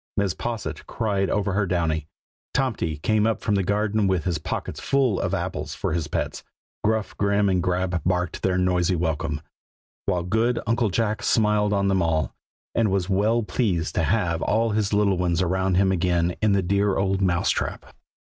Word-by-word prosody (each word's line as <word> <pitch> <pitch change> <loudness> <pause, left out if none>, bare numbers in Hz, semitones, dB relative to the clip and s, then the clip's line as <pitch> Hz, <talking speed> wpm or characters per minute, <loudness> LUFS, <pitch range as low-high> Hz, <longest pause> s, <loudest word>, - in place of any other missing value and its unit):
Mrs. 100 -4 0
Posset 120 -2 -4
cried 100 -4 -1
over 100 -2 0
her 100 0 +1
Downy; 80 -4 0 0.5
Tomty 115 - 0
came 110 0 +3
up 115 - 0
from 105 - -1
the 100 - +2
garden 105 +1 +1
with 95 -4 +1
his 90 -4 -1
pockets - - -4
full 130 -7 +1
of - - -1
apples - - -4
for - - -2
his 80 -2 -1
pets; - - -3 0.4
Gruff 110 -1 0
and - - -21
Grim 100 0 +2
and 90 -1 +2
Grab 90 -1 0
barked 90 -1 -1
their 95 -1 +1
noisy 90 0 +2
welcome; 80 -3 -2 0.7
while 90 -1 +1
good 110 +7 +1
Uncle 115 0 +1
Jack 110 +3 0
smiled 105 -2 +2
on 100 -1 +1
them 95 -1 +2
all, 80 -2 0 0.4
and 115 -2 +2
was 95 -1 0
well 110 +5 +2
pleased 95 -8 -1
to - - +1
have 85 0 +1
all 115 +1 +1
his 105 -1 0
little 100 -3 +2
ones 85 -2 +1
around 95 +1 +1
him 95 +1 +3
again 85 -1 +1
in 105 -2 +3
the 100 -1 +2
dear 100 +2 +1
old 95 0 0
Mouse 90 -3 +2
trap. - - -3
95 Hz, 185 wpm, -24 LUFS, 90-105 Hz, 0.7 s, came